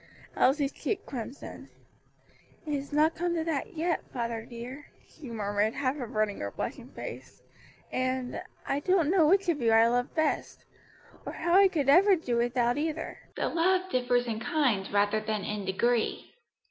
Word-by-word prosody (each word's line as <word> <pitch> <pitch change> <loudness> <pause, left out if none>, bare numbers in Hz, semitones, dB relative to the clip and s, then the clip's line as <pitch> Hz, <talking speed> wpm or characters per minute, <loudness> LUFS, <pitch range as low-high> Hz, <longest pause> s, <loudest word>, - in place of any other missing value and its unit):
Elsie's 275 +1 +3
cheek 425 - -3
crimsoned. 255 +1 -7 1.0
"It 300 - -3
has 280 0 -3
not 305 +2 +3
come 345 0 -1
to 325 - 0
that 320 -2 -3
yet, 335 +1 0
father 230 -2 -3
dear," 250 +4 -8 0.2
she 285 -5 -11
murmured, 210 -1 -1
half 270 -1 0
averting 215 -4 -1
her 100 - -3
blushing - - -5
face; - - -9 0.5
"and 255 -1 -2 0.2
I 275 - 0
don't 345 -1 +2
know 350 -5 +5
which 390 +3 +3
of 320 -6 +1
you 230 -1 +3
I 225 0 +6
love 245 +2 0
best 315 -1 -1 0.6
or - - -6
how 345 - -1
I 390 +1 +8
could 315 -8 -1
ever 375 +8 +7
do 260 -8 -2
without 240 +2 +1
either: 315 +1 -3 0.2
the - - -1
love 370 +2 +1
differs 245 -2 +2
in 225 -2 -3
kind 240 - 0
rather 205 +1 +2
than 215 -1 -3
in 210 0 -3
degree." 230 +5 0
260 Hz, 165 wpm, -29 LUFS, 230-320 Hz, 1.0 s, I